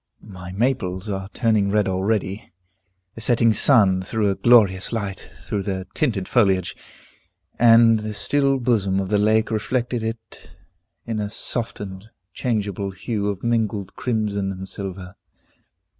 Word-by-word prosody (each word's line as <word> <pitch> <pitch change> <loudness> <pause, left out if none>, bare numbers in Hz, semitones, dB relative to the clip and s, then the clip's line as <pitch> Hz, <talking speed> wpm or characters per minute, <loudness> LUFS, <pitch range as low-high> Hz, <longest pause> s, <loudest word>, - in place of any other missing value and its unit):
The 95 -3 -10
maples 105 -5 -1
are 95 -1 -4
turning 110 -3 +1
red 105 0 +1
already. 95 +1 -2 0.6
The 115 - -10
setting 115 -1 +3
sun 100 -6 +4
threw 105 +2 0
a - - -2
glorious 100 -6 +4
light 100 -4 -4
through 100 - -3
their 95 -1 -3
tinted 110 -11 -1
foliage, 95 -7 +2 0.8
and 115 -1 +6
the 105 0 -5
still 140 +3 +2
bosom 105 -6 +1
of 95 -1 -3
the 105 0 +2
lake 110 +2 +2
reflected 120 +2 -1
it 110 0 -7 0.6
in 115 -2 -3
a 105 -1 -3
softened, 105 -3 -5 0.2
changeable 100 -5 -2
hue 100 +2 -3
of 100 -2 -5
mingled 110 -4 -1
crimson 105 -5 -1
and 95 0 -7
silver. 95 -2 -6
105 Hz, 135 wpm, -22 LUFS, 95-115 Hz, 0.8 s, and